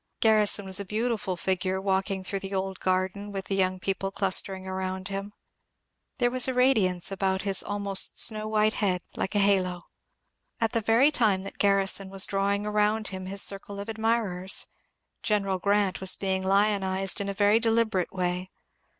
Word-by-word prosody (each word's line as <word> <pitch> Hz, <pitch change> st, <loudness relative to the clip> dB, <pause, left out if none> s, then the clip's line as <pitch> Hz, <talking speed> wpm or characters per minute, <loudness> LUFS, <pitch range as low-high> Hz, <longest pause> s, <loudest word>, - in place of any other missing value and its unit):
Grarrison 215 Hz, -2 st, +3 dB
was 190 Hz, +1 st, +2 dB
a -, -, -3 dB
beautiful 215 Hz, -2 st, -2 dB
figure 185 Hz, +1 st, -1 dB
walking 190 Hz, 0 st, -1 dB
through 195 Hz, +1 st, -4 dB
the 195 Hz, 0 st, -6 dB
old 190 Hz, 0 st, -3 dB
garden 190 Hz, +2 st, -1 dB
with 195 Hz, -1 st, -5 dB
the 195 Hz, -, -2 dB
young 185 Hz, -1 st, 0 dB
people 195 Hz, 0 st, -2 dB
cluster 195 Hz, 0 st, +2 dB
ing 190 Hz, 0 st, -10 dB
around 190 Hz, 0 st, -4 dB
him. 195 Hz, +1 st, -5 dB, 0.9 s
There 245 Hz, -3 st, +1 dB
was 255 Hz, 0 st, +1 dB
a 260 Hz, -, -2 dB
radiance 210 Hz, -9 st, +2 dB
about 190 Hz, -1 st, -1 dB
his 195 Hz, -2 st, +3 dB
almost 200 Hz, -1 st, 0 dB
snow 215 Hz, -1 st, +2 dB
white 215 Hz, 0 st, +2 dB
head 185 Hz, -4 st, 0 dB
like 190 Hz, -, -3 dB
a -, -, +3 dB
halo. 185 Hz, -3 st, +1 dB, 0.8 s
At 225 Hz, -1 st, +1 dB
the 230 Hz, -, 0 dB
very 230 Hz, +7 st, +4 dB
time 210 Hz, -8 st, +2 dB
that 195 Hz, -, -8 dB
Garrison 195 Hz, -1 st, +2 dB
was 195 Hz, 0 st, +1 dB
drawing 200 Hz, +1 st, -1 dB
around 210 Hz, +1 st, +1 dB
him 185 Hz, -1 st, -7 dB
his 195 Hz, +1 st, +1 dB
circle 200 Hz, 0 st, -4 dB
of 200 Hz, +2 st, -6 dB
admirers. 220 Hz, -5 st, +1 dB, 0.6 s
General 200 Hz, -4 st, 0 dB
Grant 200 Hz, 0 st, +1 dB
was 190 Hz, -1 st, +4 dB
being 190 Hz, -1 st, -1 dB
lionized 195 Hz, -1 st, +1 dB
in 200 Hz, -, -3 dB
a -, -, -2 dB
very 205 Hz, +2 st, +4 dB
deliberate 225 Hz, -5 st, 0 dB
way. 180 Hz, 0 st, -2 dB
195 Hz, 175 wpm, -27 LUFS, 190-210 Hz, 0.9 s, very